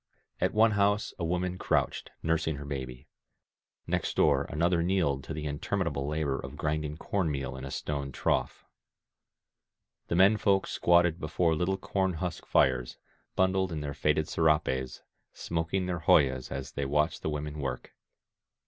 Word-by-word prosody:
At - - 0
one 110 +1 +5
house 105 0 +1
a - - -2
woman 90 +2 -1
crouched, - - 0
nursing 80 -1 0
her 70 +1 -7
baby; 65 -2 -6 0.8
next - - -1
door - - +3
another 85 +3 +1
kneeled 85 -7 +1
to - - -7
the 75 -1 -5
interminable 75 -1 -2
labor 75 -3 -1
of 70 - -7
I - - -10
grinding 75 0 -2
corn 95 -1 -1
meal 70 -3 -3
in 65 0 -7
a - - -6
stone 70 0 -3
trough. - - -1 1.4
The - - -1
men 95 +4 +6
folk 100 -2 +2
squatted 85 -1 +3
before 80 +1 +1
little 90 +4 0
corn 95 -1 -1
husk 85 +1 -4
fires, 60 -2 +2 0.4
bundled 95 0 +2
in 80 -2 -3
their 70 -1 -4
faded 75 +2 +1
serapes, 75 -5 0 0.3
smoking 85 +3 -2
their 90 -2 -2
hojas 65 -5 +3
as 65 -1 -5
they 70 - -3
watched 75 +3 0
the - - -2
women 75 0 -4
work. 65 -3 -4
80 Hz, 155 wpm, -29 LUFS, 70-90 Hz, 1.4 s, men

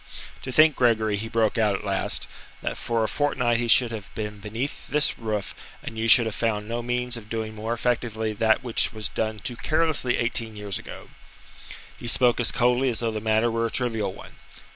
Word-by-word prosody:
"To 130 - -5
think, 155 +2 +5
Gregory," 110 -4 +2
he 105 +3 -4
broke 115 0 +1
out 105 -3 +2
at 95 - -5
last, 100 -1 0 0.4
"that - - -2
for 115 -1 -1
a - - +1
fortnight 120 -3 0
he 120 - -1
should 120 +1 +5
have 105 -4 -6
been 105 -1 -5
beneath 115 +7 -5
this 150 0 +1
roof, 110 -3 -3 0.3
and 115 - -7
you 110 +1 -1
should 115 +1 +8
have 110 - -3
found 105 -2 -1
no 120 +1 -3
means 125 0 -2
of 110 -2 -11
doing 110 -1 -3
more 110 +1 -5
effectively 115 -2 -1
that 110 +4 +2
which 120 -2 +1
was 110 -3 -4
done 110 -1 -2
too 120 +4 -3
carelessly 155 -3 0
eighteen 115 -2 -1
years 105 -2 -4
ago." - - -10 0.9
He - - -7
spoke 120 +1 +4
as 120 - +3
coldly 125 +2 +2
as 115 -2 -1
though 115 -1 0
the 110 -1 -4
matter 110 +1 +2
were 115 0 0
a - - -5
trivial 115 -6 -1
one. - - -12
115 Hz, 205 wpm, -25 LUFS, 110-120 Hz, 0.9 s, should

